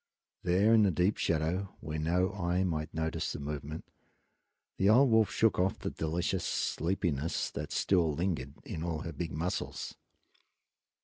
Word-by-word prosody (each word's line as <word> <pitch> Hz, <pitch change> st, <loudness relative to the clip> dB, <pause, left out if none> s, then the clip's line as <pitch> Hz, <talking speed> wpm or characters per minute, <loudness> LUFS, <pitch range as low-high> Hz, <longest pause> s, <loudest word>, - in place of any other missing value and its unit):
There, 95 Hz, +5 st, +3 dB
in 110 Hz, -, +7 dB
the 100 Hz, -, +5 dB
deep 90 Hz, +3 st, +1 dB
shadow 85 Hz, +4 st, -1 dB
where 80 Hz, 0 st, -4 dB
no 90 Hz, +5 st, +1 dB
eye 90 Hz, -1 st, 0 dB
might 80 Hz, -3 st, -2 dB
notice 80 Hz, 0 st, -2 dB
the -, -, -5 dB
movement, 75 Hz, +2 st, -5 dB, 0.9 s
the 95 Hz, -, +3 dB
old 125 Hz, +3 st, +6 dB
wolf 110 Hz, -1 st, +5 dB
shook 110 Hz, -4 st, +2 dB
off 95 Hz, +1 st, +1 dB
the -, -, -4 dB
delicious 85 Hz, +4 st, -1 dB
sleepiness 80 Hz, -3 st, -1 dB
that -, -, -5 dB
still 85 Hz, -5 st, +2 dB
lingered 75 Hz, -5 st, -2 dB
in 80 Hz, -, -5 dB
all 80 Hz, -2 st, -2 dB
her 85 Hz, -, -5 dB
big 80 Hz, +3 st, -4 dB
muscles. 85 Hz, +4 st, -3 dB
85 Hz, 150 wpm, -31 LUFS, 80-95 Hz, 0.9 s, in